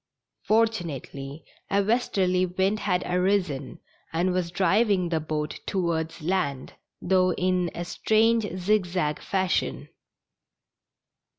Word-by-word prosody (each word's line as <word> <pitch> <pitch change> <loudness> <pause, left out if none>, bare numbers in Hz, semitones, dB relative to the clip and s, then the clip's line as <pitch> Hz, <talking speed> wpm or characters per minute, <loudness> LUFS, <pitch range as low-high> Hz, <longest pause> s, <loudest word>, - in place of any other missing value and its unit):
Fortunately 165 - -1 0.2
a 200 0 +2
westerly 190 -5 +1
wind 190 +4 0
had 180 -4 0
arisen 180 -6 0 0.3
and 175 +3 +1
was 180 -2 -1
driving 190 +1 +2
the 165 -2 +1
boat 155 -1 -3
towards 165 -4 -1
land, 155 -7 -1 0.3
though 185 0 +2
in 180 -1 0
a 175 - -4
strange 220 +3 +2
zig 195 +1 +2
zag 175 -4 -1
fashion. 190 -2 -1
180 Hz, 105 wpm, -26 LUFS, 170-195 Hz, 0.3 s, a